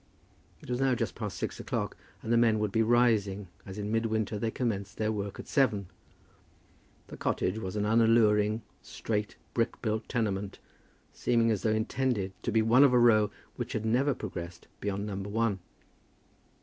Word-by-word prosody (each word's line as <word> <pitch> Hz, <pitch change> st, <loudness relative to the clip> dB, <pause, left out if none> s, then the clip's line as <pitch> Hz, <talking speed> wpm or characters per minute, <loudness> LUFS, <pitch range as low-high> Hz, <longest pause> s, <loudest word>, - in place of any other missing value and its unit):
It -, -, -13 dB
was 125 Hz, +1 st, -1 dB
now 135 Hz, -2 st, +3 dB
just -, -, -2 dB
past 105 Hz, -5 st, -5 dB
six -, -, -4 dB
o'clock, -, -, -3 dB, 0.3 s
and 115 Hz, -, 0 dB
the -, -, +5 dB
men 115 Hz, -2 st, +4 dB
would 105 Hz, -1 st, -1 dB
be 110 Hz, -, +2 dB
rising, 110 Hz, -5 st, +2 dB, 0.2 s
as 95 Hz, +1 st, -7 dB
in 105 Hz, 0 st, -3 dB
midwinter 110 Hz, -1 st, 0 dB
they 115 Hz, -, 0 dB
commenced 105 Hz, -4 st, -3 dB
their 110 Hz, 0 st, 0 dB
work 100 Hz, -2 st, -4 dB
at -, -, -8 dB
seven. 105 Hz, -, +1 dB, 1.2 s
The -, -, -10 dB
cottage 95 Hz, +4 st, -1 dB
was 95 Hz, -2 st, -5 dB
an 105 Hz, 0 st, 0 dB
unalluring, 110 Hz, -1 st, +3 dB, 0.2 s
straight 105 Hz, -2 st, -3 dB, 0.2 s
brick 115 Hz, 0 st, 0 dB
built 110 Hz, -1 st, -2 dB
tenement, 100 Hz, -5 st, -2 dB, 0.6 s
seeming 115 Hz, -2 st, +2 dB
as 105 Hz, -4 st, 0 dB
though 110 Hz, -, +1 dB
intended 110 Hz, -2 st, 0 dB
to 120 Hz, -, -2 dB
be 110 Hz, 0 st, +3 dB
one 120 Hz, +5 st, +6 dB
of 135 Hz, -3 st, +5 dB
a 125 Hz, -, +6 dB
row 110 Hz, -3 st, +5 dB, 0.3 s
which -, -, -4 dB
had 110 Hz, 0 st, -2 dB
never 130 Hz, +5 st, +2 dB
progressed 85 Hz, -4 st, -7 dB
beyond 100 Hz, 0 st, -2 dB
Number 100 Hz, -1 st, -4 dB
One. 110 Hz, -2 st, 0 dB
110 Hz, 175 wpm, -29 LUFS, 100-115 Hz, 1.2 s, one